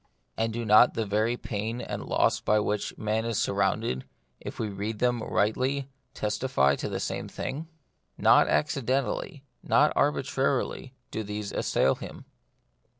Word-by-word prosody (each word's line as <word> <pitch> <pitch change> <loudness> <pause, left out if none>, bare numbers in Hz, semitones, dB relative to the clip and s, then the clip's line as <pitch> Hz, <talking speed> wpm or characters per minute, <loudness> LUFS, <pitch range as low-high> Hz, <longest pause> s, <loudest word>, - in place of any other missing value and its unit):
And 115 0 0
do 115 +1 -3
not 110 +3 +6
the 115 - -1
very 110 +4 +1
pain 110 +2 -4
and - - -5
loss - - +2
by 105 - +2
which 105 0 -2
man 110 +1 -1
is 115 -2 -2
surrounded, 100 - 0 0.4
if - - -8
we 110 - -2
read 105 +2 -4
them 120 0 +1
rightly, 130 +7 0 0.3
testify 105 - +1
to - - -3
the - - -3
same - - -3
thing? 155 +5 -5 0.5
Not - - +5
acci 150 -2 +1
dentally, 135 - -1 0.2
not 150 +1 +3
arbitrarily, 135 -2 0 0.2
do 110 - -3
these 105 0 -5
assail 65 - +2
him. - - -9
115 Hz, 150 wpm, -27 LUFS, 105-130 Hz, 0.5 s, not